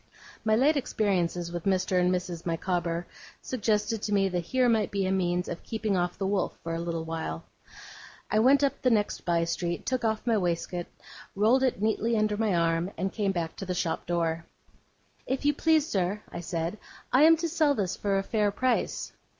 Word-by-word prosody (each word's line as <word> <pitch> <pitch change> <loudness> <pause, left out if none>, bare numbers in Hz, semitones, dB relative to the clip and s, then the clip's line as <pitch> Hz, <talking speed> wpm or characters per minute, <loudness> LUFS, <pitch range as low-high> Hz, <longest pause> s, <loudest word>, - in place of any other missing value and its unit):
My 220 0 +3
late 285 +6 +4
experiences 180 -8 0
with 175 -1 -5
Mr. 185 -1 +2
and 180 0 +3
Mrs. 180 -2 -3
Micawber 170 0 -1 0.3
suggested 215 -2 -1
to 210 - -3
me 195 -1 +3
that 180 -1 -1
here 255 +4 +2
might 220 -3 +2
be 200 -1 -1
a 185 - 0
means 180 -1 0
of 170 - -5
keeping 220 -3 -2
off 175 -1 -1
the 195 - -2
wolf 195 0 -1
for 165 - -3
a 165 - -2
little 170 -1 -3
while. 160 - -4 0.9
I 215 - +3
went 270 +5 +5
up 280 - 0
the 255 - +3
next 210 -3 0
by 170 -1 +2
street, 170 +1 -2
took 255 -2 -1
off 220 0 0
my 230 -2 +3
waistcoat, 175 0 -2 0.5
rolled 220 +6 +4
it 255 -6 0
neatly 220 +1 +1
under 215 -1 +1
my 210 -3 +1
arm, 165 +1 +1
and 190 +3 -2
came 205 -3 0
back 170 -3 -3
to 195 - -5
the 180 - -2
shop 170 -2 -2
door. 165 -1 0 0.8
'If 265 +2 -2
you 290 - +4
please, 315 0 +3
sir,' 195 - -1
I 175 - -5
said, 170 +3 -3 0.3
'I 260 - +6
am 325 +1 +7
to 335 +1 -1
sell 310 -3 +2
this 190 -4 -1
for 200 -1 0
a 195 - 0
fair 210 0 +1
price. 255 +5 -1
195 Hz, 200 wpm, -28 LUFS, 175-225 Hz, 0.9 s, am